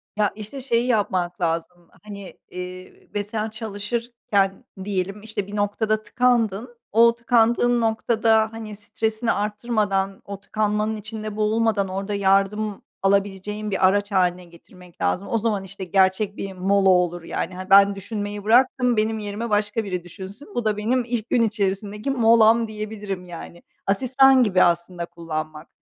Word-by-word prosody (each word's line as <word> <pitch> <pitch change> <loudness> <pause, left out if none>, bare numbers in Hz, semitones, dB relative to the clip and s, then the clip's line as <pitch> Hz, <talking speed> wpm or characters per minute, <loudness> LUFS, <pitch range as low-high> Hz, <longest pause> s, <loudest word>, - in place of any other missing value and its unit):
Ya, 210 -1 +1
işte, 215 +6 -8
şeyi 240 -1 0
yapmak 185 -5 0
lazım, 170 +1 -3
hani, 200 -2 -10
eee, 180 0 -9
ve 205 0 -1
sen 215 +1 -3
çalışırken 215 -2 -2 0.2
diyelim, 195 +1 -3
işte, 210 -2 -4
bir 205 - -7
noktada 215 +1 0
tıkandın, 235 0 0
o 230 +2 +5
tıkandığın 240 0 +2
noktada, 220 0 +2
hani, 215 -2 -7
stresini 220 +2 -2
arttırmadan, 205 -2 -1
o 200 -1 -7
tıkanmanın 210 +1 -1
içinde 215 0 -6
boğulmadan 215 -1 +1
orada 195 +2 -4
yardım 200 +1 +1 0.2
alabileceğin 200 +1 0
bir 190 -1 +4
araç 205 +1 +1
hâline 180 -1 +1
getirmek 175 +1 -17
lazım. 195 +2 0
O 230 - 0
zaman, 210 -3 -1
işte, 195 0 -9
gerçek 190 +3 +1
bir 195 -1 -5
mola 195 +1 +2
olur, 175 -2 +2
yani. 180 +2 -4
Hani, 185 +1 -8
ben 200 0 +7
düşünmeyi 205 0 -5
bıraktım, 245 +1 +3
benim 220 +1 0
yerime 210 +3 -4
başka 210 +2 0
biri 180 -3 -4
düşünsün. 195 - -11
Bu 240 - -1
da 210 -1 +1
benim 240 +4 +1
ilk 235 -2 -3
gün 240 - +3
içerisindeki 210 +2 -1
molam 230 -2 +5
diyebilirim, 210 -3 -6
yani. 170 0 -10 0.2
Asistan 260 +5 +4
gibi 190 -4 +4
aslında 175 0 0
kullanmak. 155 -2 -6
205 Hz, 145 wpm, -23 LUFS, 190-225 Hz, 0.2 s, ben